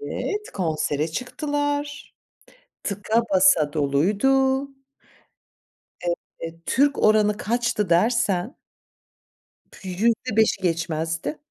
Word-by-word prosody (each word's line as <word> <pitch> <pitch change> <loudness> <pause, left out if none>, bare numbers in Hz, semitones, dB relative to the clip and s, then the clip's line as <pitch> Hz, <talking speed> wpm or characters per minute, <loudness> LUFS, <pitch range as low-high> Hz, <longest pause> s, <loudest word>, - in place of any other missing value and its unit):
Evet, 420 0 -4
konsere 155 -4 -1
çıktılar, 290 - -3 0.7
tıka 210 +3 0
basa 185 -6 +4
doluydu. 215 - +2 1.7
Evet, 165 0 -8
Türk 280 +3 +2
oranı 215 -1 +4
kaçtı 230 -4 -1
dersen 215 - +1 1.3
%5'i 220 +3 +1
geçmezdi. 165 - -2
210 Hz, 70 wpm, -23 LUFS, 165-265 Hz, 1.7 s, basa